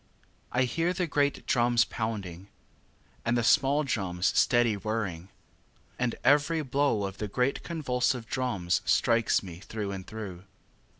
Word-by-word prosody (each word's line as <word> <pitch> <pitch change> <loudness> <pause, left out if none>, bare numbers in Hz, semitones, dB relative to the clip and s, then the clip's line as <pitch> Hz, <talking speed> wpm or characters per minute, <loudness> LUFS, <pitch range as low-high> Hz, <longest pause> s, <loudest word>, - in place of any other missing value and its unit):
4. 125 - +1
I - - +5
hear 165 +8 0
the 180 -1 -1
great 145 -3 0
drums 120 -1 +3
pounding, 100 -5 -5 0.8
And 120 +1 +1
the 120 - +1
small 140 +5 +4
drums 95 -9 -1
steady 120 -2 +4
whirring; 100 -4 -3 0.7
And 125 -1 0
every 150 +2 +3
blow 135 -5 +1
of 95 0 -5
the 105 - -2
great 125 +6 0
convulsive 125 -7 -1
drums 105 -9 -1
Strikes 115 -2 +2
me 90 -3 -9
through 105 0 -5
and 95 -1 -7
through. 100 -4 -7
115 Hz, 140 wpm, -28 LUFS, 100-135 Hz, 0.8 s, I